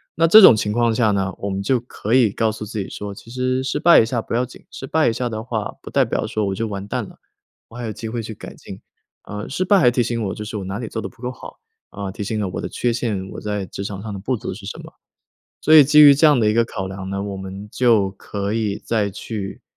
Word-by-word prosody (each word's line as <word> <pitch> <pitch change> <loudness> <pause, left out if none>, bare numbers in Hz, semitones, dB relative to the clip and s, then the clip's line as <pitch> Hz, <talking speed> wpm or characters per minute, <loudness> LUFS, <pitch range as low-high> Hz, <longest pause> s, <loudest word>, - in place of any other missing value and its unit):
那 165 - +3
这 215 +6 +9
种 130 - +9
情 105 -1 -1
况 115 0 +1
下 110 -3 +3
呢， 95 -1 0
我 100 - -3
们 95 0 -3
就 125 +6 +1
可 120 -2 -4
以 115 -6 +4
告 110 +1 0
诉 110 0 -7
自 105 +1 -5
己 95 - -4
说： 100 -1 -6
“其 115 - -14
实 130 +1 -1
失 135 - -2
败 170 - +7
一 110 - +4
下 115 0 -2
不 - - -7
要 125 +2 +1
紧， 125 - -15
失 135 - -8
败 160 -3 +2
一 - - -1
下 125 +1 -2
的 110 0 -5
话 110 -4 -4
不 - - -9
代 - - +3
表 - - -2
说 110 -1 -2
我 95 - -2
就 115 +2 -2
完 100 -1 -6
蛋 - - -2
了， - - -13 0.5
我 - - -15
还 120 - -5
有 110 - -3
机 110 +2 -7
会 115 -1 -4
去 110 - -6
改 - - -11
进。 - - -11 0.4
呃， 105 0 -7
失 185 +7 -1
败 200 +1 +5
还 125 -7 +5
提 120 - +1
醒 115 -1 -2
我， 95 - -2
就 105 - -6
是 110 - -7
我 100 - -5
哪 95 +3 -4
里 115 - -5
做 110 - -4
得 - - -5
不 120 0 -22
够 125 - -3
好， - - -12 0.3
啊， 100 -1 -6
提 100 - -6
醒 110 +2 -3
了 105 - -1
我 - - -5
的 - - -5
缺 120 -1 -1
陷， 105 -6 -2
我 - - -8
在 105 -2 -3
职 100 - -7
场 100 -1 -6
上 105 -2 -6
的 100 - -6
不 125 +5 -2
足 120 - -5
是 105 - -11
什 105 - -7
么。” - - -11 0.7
所 155 - +5
以 150 - +11
基 150 +2 +5
于 145 -1 +10
这 150 +3 +4
样 145 -4 +5
的 110 - +2
一 - - +1
个 115 +1 +3
考 95 -4 -5
量 95 0 -7
呢， 100 0 -3
我 100 -1 -5
们 95 +2 -8
就 110 -6 +3
可 100 +1 -5
以 110 -3 -1
再 105 -3 0
去 100 0 -6
110 Hz, 315 characters per minute, -21 LUFS, 100-120 Hz, 0.7 s, 以